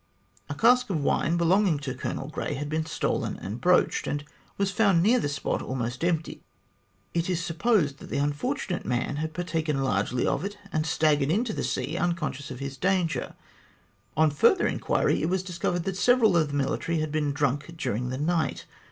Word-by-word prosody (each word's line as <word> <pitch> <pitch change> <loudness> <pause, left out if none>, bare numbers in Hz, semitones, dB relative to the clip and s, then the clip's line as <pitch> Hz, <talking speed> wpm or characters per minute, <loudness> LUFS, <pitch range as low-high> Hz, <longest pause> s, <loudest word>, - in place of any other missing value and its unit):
A 145 - -3
cask 245 +6 +4
of 160 -7 -1
wine 165 +4 +1
belonging 175 0 +3
to 135 -3 -3
Colonel 135 +1 -4
Grey 150 -1 -3
had 145 +2 -4
been 155 +1 -1
stolen - - -1
and 105 +6 -6
broached, 180 0 +3
and 145 0 -2 0.3
was 195 -1 +1
found 195 -4 +3
near 240 +5 +4
the 145 - -1
spot 140 - -2
almost 125 +1 -3
empty. 165 -2 -1 0.7
It 170 +1 0
is 175 -1 -1
supposed 165 -4 +1
that - - -11
the - - -2
unfortunate 150 - -1
man 125 +3 -1
had 160 +1 -3
partaken 160 -5 -1
largely 115 0 0
of - - 0
it, 205 +1 -5 0.2
and 155 0 0
staggered 150 -3 +2
into 215 +6 +1
the - - -3
sea - - -2
unconscious 160 -5 -2
of 130 - -6
his 135 +1 -6
danger. 180 -2 0 0.8
On 155 -1 +4
further 145 - +4
inquiry, - - +1
it 160 - 0
was 185 0 0
discovered 175 -1 -2
that 190 +1 -3
several 230 -2 +4
of 160 -3 +3
the 145 - -5
military 145 +4 0
had 155 -1 -1
been 150 -1 0
drunk 145 +3 -1
during 125 -6 -2
the 130 - -3
night. 155 0 -1
160 Hz, 185 wpm, -27 LUFS, 145-180 Hz, 0.8 s, cask